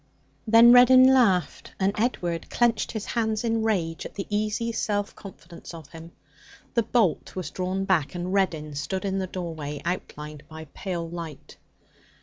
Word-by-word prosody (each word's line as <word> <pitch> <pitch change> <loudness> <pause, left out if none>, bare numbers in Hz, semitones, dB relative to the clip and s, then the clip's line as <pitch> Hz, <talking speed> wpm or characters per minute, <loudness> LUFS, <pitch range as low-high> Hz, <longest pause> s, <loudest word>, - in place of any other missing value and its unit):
Then 230 +2 +8
Reddin 255 +1 +8
laughed, 195 -9 +1
and 195 +1 +1
Edward 175 -7 -2
clenched 235 -2 +1
his 220 -2 -4
hands 220 -1 -1
in 225 -1 0
rage 180 -7 -1
at - - -9
the 195 - -4
easy 215 +2 -1
self 205 -2 -2
confidence 170 -3 -12
of 160 -4 -12
him. 165 0 -11 0.6
The 235 - +3
bolt 220 -6 0
was 185 -2 -5
drawn 185 +1 -2
back, 185 -4 +1
and 175 +2 -3
Reddin 160 -6 0
stood 165 +7 -4
in 195 0 -1
the 190 - -2
doorway, 160 -6 -5
outlined 150 -4 -5
by 160 0 -9
pale 175 -3 -4
light. 165 -4 -9
190 Hz, 155 wpm, -25 LUFS, 165-220 Hz, 0.6 s, Then